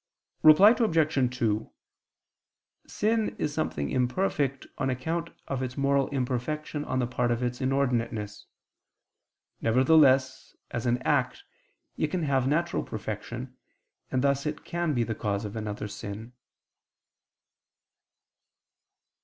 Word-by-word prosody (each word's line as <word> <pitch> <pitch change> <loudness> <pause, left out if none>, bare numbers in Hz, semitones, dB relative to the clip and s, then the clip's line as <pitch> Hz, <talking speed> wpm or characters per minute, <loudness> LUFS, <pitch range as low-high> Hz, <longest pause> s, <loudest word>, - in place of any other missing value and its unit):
Reply 155 +8 +8
Obj. 155 - +1
2: 110 -3 0 1.2
Sin 220 +1 0
is 145 - -2
something 75 - -2
imperfect 135 +1 0
on 135 - 0
account 165 +7 -2 0.2
of 135 -2 -2
its 130 +1 -4
moral 140 -1 +2
imperfection 140 +3 -2
on 130 - -2
the 125 - +1
part 120 0 -1
of 120 +1 0
its 125 0 -2
inordinateness. 120 -6 -1 1.2
Nevertheless, 130 +2 +3 0.2
as 120 0 -3
an 120 +1 +1
act 145 - 0 0.5
it - - +1
can 180 -3 -2
have 135 -3 +1
natural 170 +4 +1
perfection: 120 +4 -6 0.5
and 130 0 0
thus 140 +1 +1
it 150 0 -5
can 170 -3 -1
be 120 - +2
the 115 - -2
cause 105 0 -2
of 105 - -6
another 105 -1 -4
sin. 105 +3 -7
130 Hz, 120 wpm, -28 LUFS, 120-150 Hz, 1.2 s, Reply